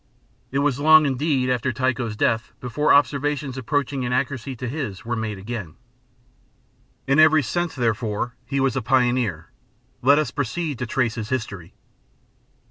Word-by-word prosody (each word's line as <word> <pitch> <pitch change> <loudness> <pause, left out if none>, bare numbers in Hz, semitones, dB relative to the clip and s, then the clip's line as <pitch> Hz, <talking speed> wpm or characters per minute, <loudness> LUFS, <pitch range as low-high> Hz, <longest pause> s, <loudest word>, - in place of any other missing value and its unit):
It 135 - -3
was 140 -2 +1
long, 155 +1 +7
indeed, 135 -1 0
after 125 0 0
Tycho's 125 -3 -1
death 110 +1 0
before 125 +5 0
observations 145 -1 +2
approaching 140 +1 -1
in 125 0 -2
accuracy 130 0 -2
to 125 +1 -5
his 120 -8 -5
were 120 - -2
again 110 -1 -4
made. 80 - -19 1.3
In 135 +3 +2
every 155 -1 +6
sense, 175 +7 -2
therefore, 115 -1 -1
he 140 0 -2
was 135 -2 +1
a 135 - 0
pioneer: 120 -8 +1 0.5
let 140 +3 +5
us 155 - 0
proceed 145 +1 -3
to 125 - -3
trace 115 -1 0
his 110 -2 -5
history. 100 -9 -4
130 Hz, 150 wpm, -23 LUFS, 115-145 Hz, 1.3 s, long